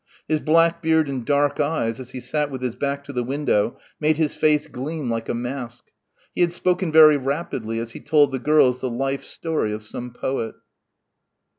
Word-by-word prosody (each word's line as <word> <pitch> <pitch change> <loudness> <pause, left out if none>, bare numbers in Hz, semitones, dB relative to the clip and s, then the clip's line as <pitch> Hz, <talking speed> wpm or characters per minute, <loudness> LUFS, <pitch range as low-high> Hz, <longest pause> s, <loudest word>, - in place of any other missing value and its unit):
His 155 -1 +1
black 165 +2 +3
beard 160 -1 +3
and 135 -3 -3
dark 145 +2 +1
eyes 145 -7 0
as 130 -1 -8
he 130 - -7
sat 150 +3 -1
with 130 -2 -6
his 125 -2 -1
back 140 +1 -3
to 140 - -9
the 125 -1 -1
window 130 -4 0 0.2
made 155 0 +2
his 155 -2 +1
face 150 -1 +2
gleam 145 -1 -4
like 115 0 -3
a - - 0
mask. 120 0 -6 0.4
He - - -2
had 175 -1 +3
spoken 180 0 0
very 155 -1 +8
rapidly 130 -5 -3
as 115 0 -4
he - - -9
told 145 -3 +3
the 130 - -2
girls 130 -3 +3
the 130 - -1
life 135 +3 -2
story 160 -10 -2
of 105 0 -5
some 120 +3 -6
poet. 120 -1 -3
140 Hz, 195 wpm, -23 LUFS, 125-155 Hz, 0.4 s, very